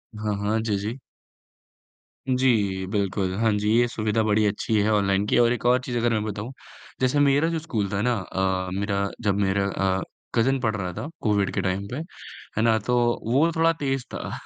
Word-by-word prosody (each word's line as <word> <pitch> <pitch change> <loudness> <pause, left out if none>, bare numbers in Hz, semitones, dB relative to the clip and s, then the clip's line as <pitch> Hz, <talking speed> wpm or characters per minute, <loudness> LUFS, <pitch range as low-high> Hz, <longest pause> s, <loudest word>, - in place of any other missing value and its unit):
हाँ, 105 -1 -2
हाँ, 105 +2 0
जी, 110 -2 -1
जी। 110 +6 -4 1.3
जी, 115 -8 +1
बिल्कुल, 100 -2 -1
हाँ 115 -1 +3
जी, 105 +1 0
ये 120 - +3
सुविधा 110 -1 0
बड़ी 110 0 +2
अच्छी 105 +2 0
है 110 - +2
ऑनलाइन 100 -1 +2
की - - +2
और 120 0 +4
एक 120 - -5
और 125 +1 +5
चीज़ 125 -3 -3
अगर 120 0 +1
मैं 105 -1 0
बताऊँ 105 +3 -5 0.5
जैसे 130 +3 +2
मेरा 145 +2 +4
जो 165 -1 -1
स्कूल 115 - -2
था 100 - -1
ना 125 +2 +2
अ, 95 -1 -1
मेरा 100 0 -1
जब 100 -3 +1
मेरा 100 0 +1
अ, 95 -1 0 0.3
कजिन 130 +4 +2
पढ़ 110 -3 0
रहा 90 -3 -3
था 145 - -5
कोविड 105 -3 +1
के - - 0
टाइम 95 +1 -2
पे 125 - -3 0.6
है - - +2
ना, 115 -1 +4
तो 125 +4 -1 0.4
वो 155 +6 +4
थोड़ा 165 0 +4
तेज़ 135 -5 -2
था। - - -5
110 Hz, 200 wpm, -24 LUFS, 100-125 Hz, 1.3 s, और